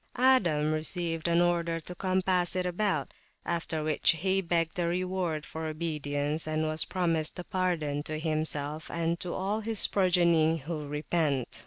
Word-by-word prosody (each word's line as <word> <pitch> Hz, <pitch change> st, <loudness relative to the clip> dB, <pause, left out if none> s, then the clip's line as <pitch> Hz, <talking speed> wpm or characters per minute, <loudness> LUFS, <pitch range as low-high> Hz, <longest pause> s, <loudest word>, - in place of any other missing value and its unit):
Adam 180 Hz, -13 st, +3 dB
received 165 Hz, +1 st, -1 dB
an 170 Hz, 0 st, +3 dB
order 170 Hz, -1 st, +1 dB
to 170 Hz, +2 st, -8 dB
compass 185 Hz, -1 st, +1 dB
it 185 Hz, 0 st, 0 dB
about; 180 Hz, -5 st, -1 dB, 0.3 s
after 165 Hz, -2 st, -2 dB
which, 155 Hz, 0 st, +4 dB
he 190 Hz, +4 st, 0 dB
begged 170 Hz, 0 st, 0 dB
a 170 Hz, -, +1 dB
reward 180 Hz, -3 st, -1 dB
for 160 Hz, 0 st, -5 dB
obedience, 155 Hz, -1 st, -1 dB
and 155 Hz, 0 st, 0 dB
was 155 Hz, 0 st, -1 dB
promised 165 Hz, -4 st, 0 dB
a 180 Hz, -, -5 dB
pardon 175 Hz, -7 st, -1 dB
to 155 Hz, +1 st, -4 dB
himself 155 Hz, -1 st, -2 dB
and 170 Hz, 0 st, -1 dB
to 180 Hz, -, -4 dB
all 195 Hz, +4 st, -1 dB
his 220 Hz, -1 st, 0 dB
progeny 170 Hz, -4 st, +3 dB
who 155 Hz, 0 st, -5 dB
repent. 150 Hz, -3 st, -1 dB
165 Hz, 155 wpm, -29 LUFS, 155-180 Hz, 0.3 s, which